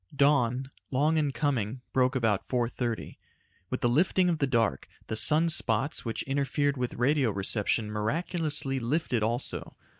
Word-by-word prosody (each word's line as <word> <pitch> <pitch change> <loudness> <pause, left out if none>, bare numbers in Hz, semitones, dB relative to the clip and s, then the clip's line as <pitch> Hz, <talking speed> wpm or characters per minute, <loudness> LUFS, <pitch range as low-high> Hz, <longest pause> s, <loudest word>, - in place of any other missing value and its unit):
Dawn, 135 -2 +2 0.2
long 150 +4 +1
in 150 -3 +1
coming, 130 -5 -2
broke 130 0 +2
about 110 -6 0
4:30. 120 -1 -3 0.5
With 130 - -3
the - - +2
lifting 175 +8 +2
of 165 -3 -1
the 140 - +1
dark, 115 - 0 0.2
the 110 - -4
sun 155 +9 +6
spots 135 -2 +2
which 115 -2 -3
interfered 140 +1 0
with 125 -2 -3
radio 135 0 +2
reception 105 +2 0
miraculously 145 - -1
lifted 125 -1 -1
also. 115 +4 -2
130 Hz, 145 wpm, -28 LUFS, 115-145 Hz, 0.5 s, sun